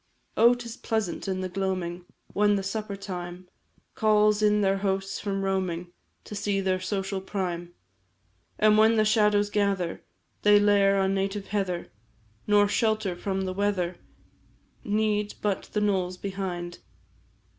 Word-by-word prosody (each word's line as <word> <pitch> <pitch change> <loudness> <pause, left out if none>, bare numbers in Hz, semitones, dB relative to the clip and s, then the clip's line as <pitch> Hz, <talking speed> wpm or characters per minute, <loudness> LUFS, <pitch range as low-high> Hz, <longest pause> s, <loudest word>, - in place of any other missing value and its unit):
Oh, 235 +2 +6
'tis 235 0 -8
pleasant, 220 -5 -2
in 190 -1 -1
the 185 - -2
gloaming, 180 -2 -3 0.3
When 205 0 +3
the 195 - -1
supper 210 +1 -3
time 180 -2 -7 0.5
Calls 210 -1 +3
all 210 - +5
their 195 0 +2
hosts 195 0 -1
from 195 -1 -2
roaming, 180 -3 -2 0.3
To - - -10
see 200 -1 -1
their 190 -1 0
social 195 +1 -3
prime; 175 -3 -4 0.8
And 215 0 +5
when 220 +1 +5
the 215 -1 +3
shadows 210 -1 +3
gather, 195 -5 0 0.4
They 205 0 +6
lair 200 -1 +4
on 190 0 +1
native 195 +1 -2
heather, 190 -4 -2 0.6
Nor 205 -1 +5
shelter 215 -2 0
from 190 +1 -2
the 185 -1 -3
weather 185 -3 -1 0.9
Need, 210 0 0
but 205 -2 -2
the 210 - 0
knolls 185 -3 0
behind. 180 -3 -5
195 Hz, 140 wpm, -27 LUFS, 185-210 Hz, 0.9 s, Oh